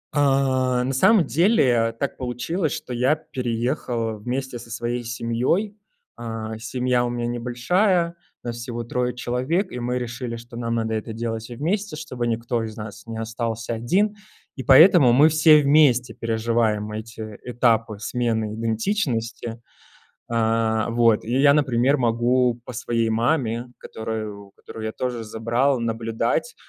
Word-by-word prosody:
А, 130 -3 +2
на 135 +1 -2
самом 190 - +5
деле, 130 - +3
так 140 - -2
получилось, 135 +7 -2
что 125 - -5
я 125 +5 +2
переехал 120 -4 -3
вместе 125 +2 -4
со 115 - -12
своей 120 +1 -3
семьёй. 120 - -1 0.4
А, 115 -1 -5
семья 125 +1 0
у 120 - -1
меня 120 0 -3
небольшая, 170 - +1 0.3
нас 120 -1 -4
всего 120 0 -5
3 125 +1 -2
человек, 130 +10 -1
и 125 - -5
мы 125 +1 -1
решили, 120 0 -4
что 120 +1 -11
нам 115 -1 -2
надо 110 -1 -1
это 110 +1 -4
делать 115 0 -3
всем 120 0 -9
вместе, 190 +2 -1
чтобы 130 -6 -4
никто 115 0 -1
из 110 -1 -7
нас 105 +1 -9
не 115 -1 -6
остался 115 0 -3
1, 190 - +1 0.4
и 130 - -5
поэтому 140 -2 +7
мы 145 +5 +6
все 155 -1 +6
вместе 140 -4 +4
переживаем 110 -2 0
эти 110 -1 -7
этапы 115 -3 +1
смены 110 -1 -1
идентичности. 115 - -2 0.6
А, 115 -1 +1
вот, 115 -2 +3
и 120 +4 -1
я, 140 0 +6
например, 135 -1 +2
могу 120 0 +2
по 125 - -8
своей 115 -1 -1
маме, 120 0 0
которую 110 -3 -6
которую 110 -1 -9
я 110 - -2
тоже 120 -2 -3
забрал, 120 +5 0
наблюдать, 115 - -1
120 Hz, 145 wpm, -23 LUFS, 115-130 Hz, 0.6 s, поэтому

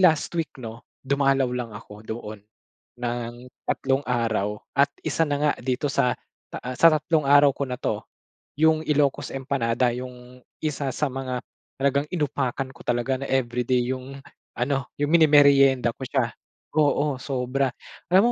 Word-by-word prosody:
last 165 -4 +4
week 165 -2 -1
'no, 115 -2 -9 0.2
dumalaw 135 -1 +2
lang 125 -2 -3
ako 105 -1 -12
doon 110 -2 -6 0.6
ng 120 0 -4 0.2
tatlong 135 +1 0
araw 110 -4 0 0.2
at 140 +1 +5 0.2
isa 165 - +1
na 145 - +1
nga 150 0 +3
dito 130 +3 -1
sa 125 -2 +2 0.4
ta - - -5
ah, 125 0 -4
sa 165 - +8
tatlong 155 0 +1
araw 145 0 +7
ko 140 - -3
na 125 - -3
'to, - - -2 0.6
'yung 160 0 +4
Ilocos 145 -3 +1
Empanada 130 -3 0
'yung 125 0 -9 0.2
isa, 145 -3 -2
sa 150 +4 -1
mga 130 -1 -3 0.4
talagang 140 +1 +1
inupakan 140 -5 -1
ko - - -15
talaga. 120 +2 0
Na, - - -4
everyday 125 -1 +1
'yung 130 +1 -8 0.4
ano 135 +1 0
'yung 145 +1 0
mini-meryenda 140 -6 +6
ko - - -20
siya 125 -3 0 0.5
oo 145 -2 +2
sobra. 135 0 -1 0.4
Alam 195 +6 +6
135 Hz, 150 wpm, -25 LUFS, 125-145 Hz, 0.6 s, sa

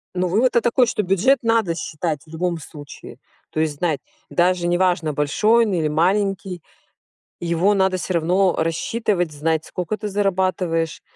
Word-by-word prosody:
Ну 180 0 0
вывод-то 235 +6 +2
такой, 245 +1 +3
что 210 - -1
бюджет 195 +9 +3
надо 225 -7 +1
считать 155 -2 -3
в - - -20
любом 170 +2 -2
случае. 145 -2 -11 0.3
То - - -3
есть 155 -2 0
знать, 160 -3 0 0.3
даже 175 0 +1
неважно 175 -3 +1
большой 210 +11 +3
он 210 - -2
или 165 -4 +1
маленький, 185 +2 0 0.8
его 170 +4 +1
надо 190 -1 +2
всё 185 0 -3
равно 180 +3 +2
рассчитывать, 175 +2 -1
знать 155 +2 -1
сколько 180 +4 -4
ты 210 0 -5
зарабатываешь, 185 -5 -1
180 Hz, 150 wpm, -21 LUFS, 165-195 Hz, 0.8 s, такой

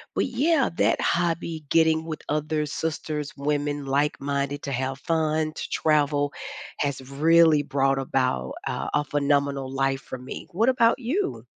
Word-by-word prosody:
But, - - +2
yeah, 275 +3 +2
that - - +3
hobby, 170 -2 0
getting 160 -1 +3
with 155 -2 -5
other 150 0 0
sisters, 150 -1 -3
women, 145 0 -1
like-minded, 140 0 -1
to 140 - -4
have 130 +1 -2
fun, 155 -1 0
to - - -6
travel, 145 -2 +1 0.5
has 140 -2 -1
really 160 +1 +5
brought 135 -1 +1
about, 130 - -1
uh, - - -3
a 150 - +2
phenomenal 140 -2 0
life 135 0 0
for 130 - -7
me. 125 - -8
What 220 +8 +1
about 235 -2 +4
you? 320 - -2
150 Hz, 145 wpm, -25 LUFS, 140-160 Hz, 0.5 s, really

